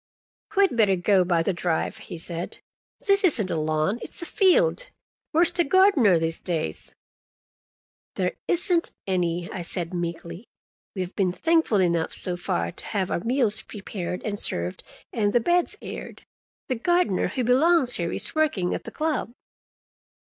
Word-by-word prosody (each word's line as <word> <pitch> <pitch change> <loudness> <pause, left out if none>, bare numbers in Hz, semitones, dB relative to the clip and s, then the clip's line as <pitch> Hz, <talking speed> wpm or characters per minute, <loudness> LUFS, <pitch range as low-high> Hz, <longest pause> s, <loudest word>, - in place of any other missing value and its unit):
"We'd 395 -9 +4
better 210 -4 +4
go 185 +1 +3
by 170 -2 +1
the 195 - 0
drive," 175 -2 -2
he - - -8
said. 170 +1 -4 0.5
"This 395 -2 +3
isn't 235 - +2
a - - 0
lawn; 155 +7 0
it's - - -6
a - - -5
field. 485 +8 +2 0.4
Where's 335 +2 +3
the 350 0 +1
gardener 310 - +4
these 165 0 -1
days?" 160 - -3 1.2
"There 180 -1 -1
isn't 350 -1 +2
any," 175 -2 -1
I 185 - -5
said 170 0 -2
meekly. 170 +3 -5 0.5
"We 185 - -1
have 180 - -9
been 190 -3 +1
thankful 320 - +2
enough, 170 -3 +1
so 180 - -1
far, 85 - -2
to - - -11
have 190 -3 -2
our - - 0
meals 230 0 +1
prepared 195 -3 -6
and 205 -2 -3
served 85 +2 -2 0.3
and 205 -3 0
the 240 - +5
beds 345 +8 +1
aired. - - -8 0.4
The 255 - -1
gardener 350 - +2
who 250 +7 -2
belongs 260 +2 +3
here 170 -1 -2
is - - -1
working 280 - +1
at - - -5
the - - -5
club." 305 -7 -2
200 Hz, 160 wpm, -25 LUFS, -, 1.2 s, the